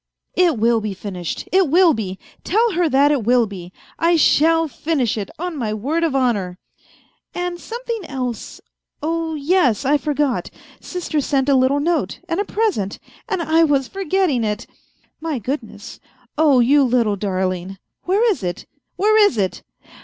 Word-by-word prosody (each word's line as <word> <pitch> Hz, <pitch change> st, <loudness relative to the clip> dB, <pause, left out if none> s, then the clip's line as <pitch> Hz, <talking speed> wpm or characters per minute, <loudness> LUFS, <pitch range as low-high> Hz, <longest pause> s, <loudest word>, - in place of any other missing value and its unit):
" -, -, -57 dB
It 330 Hz, -8 st, +1 dB
will 230 Hz, +1 st, +2 dB
be 210 Hz, -2 st, -4 dB
finished! 185 Hz, -4 st, -6 dB
It 375 Hz, -4 st, +3 dB
will 345 Hz, +1 st, +5 dB
be! 190 Hz, -6 st, -4 dB, 0.3 s
Tell 450 Hz, +5 st, +2 dB
her 350 Hz, -3 st, +1 dB
that 280 Hz, +2 st, +4 dB
it 280 Hz, -6 st, 0 dB
will 240 Hz, +1 st, +3 dB
be. 185 Hz, -4 st, -9 dB, 0.3 s
I 340 Hz, +1 st, +3 dB
shall 325 Hz, +1 st, +4 dB
finish 280 Hz, -3 st, -1 dB
it, 205 Hz, -3 st, -4 dB
on 355 Hz, 0 st, -4 dB
my 220 Hz, -6 st, -2 dB
word 295 Hz, +10 st, -1 dB
of 315 Hz, -5 st, 0 dB
honour! 205 Hz, -9 st, 0 dB, 0.3 s
" -, -, -30 dB
" -, -, -48 dB
And 355 Hz, 0 st, -3 dB
something 465 Hz, -1 st, -5 dB
else.... 255 Hz, -5 st, -5 dB, 0.4 s
Oh 325 Hz, 0 st, -1 dB
yes, 285 Hz, -, +1 dB
I 290 Hz, +2 st, +3 dB
forgot. 290 Hz, -4 st, -1 dB, 0.3 s
Sister 340 Hz, -4 st, -3 dB
sent 275 Hz, 0 st, 0 dB
a 275 Hz, -, +5 dB
little 260 Hz, +2 st, +3 dB
note 330 Hz, +1 st, -1 dB
and 330 Hz, +1 st, -2 dB
a 410 Hz, -, 0 dB
present, 395 Hz, -, -1 dB, 0.3 s
and 345 Hz, -, -1 dB
I 325 Hz, +1 st, +3 dB
was 280 Hz, -4 st, +2 dB
forgetting 380 Hz, -9 st, 0 dB
it!.. 210 Hz, +1 st, -2 dB, 0.2 s
." -, -, -40 dB
" -, -, -49 dB
My 320 Hz, -3 st, -2 dB
goodness! 260 Hz, +6 st, -6 dB, 0.4 s
Oh, 295 Hz, -4 st, +4 dB
you 280 Hz, +4 st, +4 dB
little 235 Hz, -5 st, +2 dB
darling! 185 Hz, -1 st, -2 dB, 0.3 s
Where 405 Hz, +6 st, +2 dB
is 380 Hz, -, -3 dB
it? 175 Hz, -2 st, -4 dB, 0.3 s
where 425 Hz, +3 st, +2 dB
is 405 Hz, -, +3 dB
it 190 Hz, -3 st, -1 dB
285 Hz, 175 wpm, -20 LUFS, 225-335 Hz, 0.4 s, will